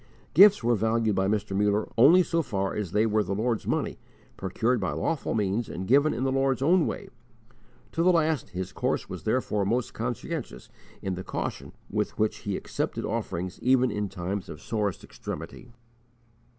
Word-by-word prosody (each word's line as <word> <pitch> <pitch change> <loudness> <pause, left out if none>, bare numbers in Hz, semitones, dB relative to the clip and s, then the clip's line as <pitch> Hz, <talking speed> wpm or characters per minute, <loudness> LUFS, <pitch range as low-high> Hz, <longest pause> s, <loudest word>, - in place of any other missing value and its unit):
Gifts 200 - +7
were 120 +1 +3
valued 110 -1 +1
by 95 0 +1
Mr. 105 -1 -1
Muller 105 +1 +2
only 160 +10 +7
so 165 -1 0
far 100 -9 -2
as 100 -5 -3
they 105 +3 +3
were 110 -1 +2
the 100 -1 -2
Lord's 115 +1 -1
money, - - -1 0.4
procured 115 +6 0
by - - -1
lawful 160 -7 -1
means 105 +2 0
and 95 - -5
given 140 +5 +5
in 125 - -2
the 135 - +1
Lord's 135 -1 +1
own 170 +3 +4
way. - - -5 0.8
To 165 - -1
the 180 +2 +5
last 160 -5 +1
his 90 0 -5
course - - -1
was - - -7
therefore 105 -1 +1
most 115 +4 -1
conscientious 125 +6 -5 0.3
in 95 - -1
the 90 +1 -5
caution - - -4
with - - -2
which 110 0 +1
he 100 -2 -3
accepted - - -3
offerings 90 +2 -3
even 130 0 +3
in 105 -1 -2
times 95 +2 -4
of 75 - -8
sorest 105 0 -2
extremity. 125 - -8
110 Hz, 175 wpm, -27 LUFS, 100-135 Hz, 0.8 s, Gifts